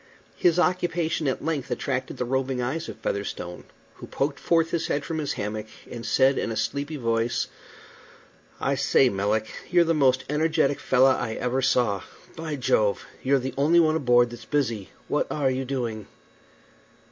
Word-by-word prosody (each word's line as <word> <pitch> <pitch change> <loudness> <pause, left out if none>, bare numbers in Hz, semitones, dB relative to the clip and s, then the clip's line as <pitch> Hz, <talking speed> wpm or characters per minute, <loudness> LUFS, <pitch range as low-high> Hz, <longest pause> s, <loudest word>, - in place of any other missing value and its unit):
His 175 -1 +3
occupation 175 -3 +1
at 130 - -2
length 155 -5 -2
attracted 130 -2 -2
the 125 - -1
roving 130 0 -1
eyes 140 +7 -2
of - - -8
Featherstone, 90 -3 -4 0.3
who - - -9
poked 140 +1 -2
forth 165 -1 +2
his 170 - -1
head 145 0 -1
from 160 -1 -3
his 150 - -2
hammock, 105 +1 -4 0.2
and 120 -1 -6
said 135 +3 +3
in - - -2
a - - -3
sleepy 145 +2 -2
voice: 115 -3 0 1.1
"I 140 - 0
say, 135 -1 +3
Melick, 105 +1 0 0.2
you're 175 -1 +5
the 165 0 +1
most 130 -4 +3
energetic 150 -1 +1
fellah 130 0 +4
I 110 - -3
ever 125 +2 -1
saw. 120 -7 +2 0.3
By 160 -2 -4
Jove! 110 -6 +1 0.2
you're 135 +1 +3
the 130 0 -3
only 160 +5 +5
one 160 -1 +4
aboard 120 -5 +3
that's 120 - -9
busy. 115 -9 -1 0.2
What - - 0
are 140 -3 +1
you 130 +1 -2
doing?" 120 -5 -3
135 Hz, 170 wpm, -25 LUFS, 120-155 Hz, 1.1 s, you're